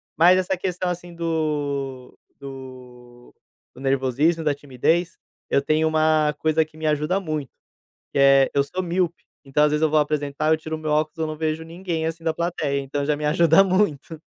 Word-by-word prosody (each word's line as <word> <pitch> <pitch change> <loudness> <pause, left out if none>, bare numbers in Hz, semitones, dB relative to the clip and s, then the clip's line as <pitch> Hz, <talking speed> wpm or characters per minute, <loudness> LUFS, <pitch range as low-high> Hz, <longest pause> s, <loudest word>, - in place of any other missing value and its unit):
Mas 175 +4 +6
essa 185 +1 0
questão, 180 0 -3
assim, 175 0 -8
do 145 -6 -3 0.2
do 125 -2 -12 0.4
do 125 - -12
nervosismo 135 +5 +1
e - - -10
da 150 - +2
timidez, 145 +5 -1 0.3
eu - - +3
tenho 155 +2 +2
uma 155 -1 +2
coisa 160 0 +2
que 155 0 -18
me 160 - -5
ajuda 150 +5 +1
muito, 155 -7 -4 0.6
que - - -1
é: 135 0 +5
eu 140 - +4
sou 180 +7 -4
míope, 175 -1 -2 0.2
então 140 +2 +2
às 150 - +3
vezes 150 +1 0
eu 160 - +3
vou 155 - +3
apresentar, 150 0 0
eu - - +4
tiro 160 0 -5
o - - -9
meu 155 -1 -4
óculos 155 +2 0
eu 160 - -1
não 155 0 -5
vejo 160 0 -2
ninguém, 165 -1 -4
assim, 165 0 -5
da 160 - +1
plateia, 160 -5 -1
então 140 +1 -3
já 150 +1 +1
me 150 - -6
ajuda 165 +4 +5
muito. 175 -5 0
155 Hz, 195 wpm, -23 LUFS, 140-165 Hz, 0.6 s, Mas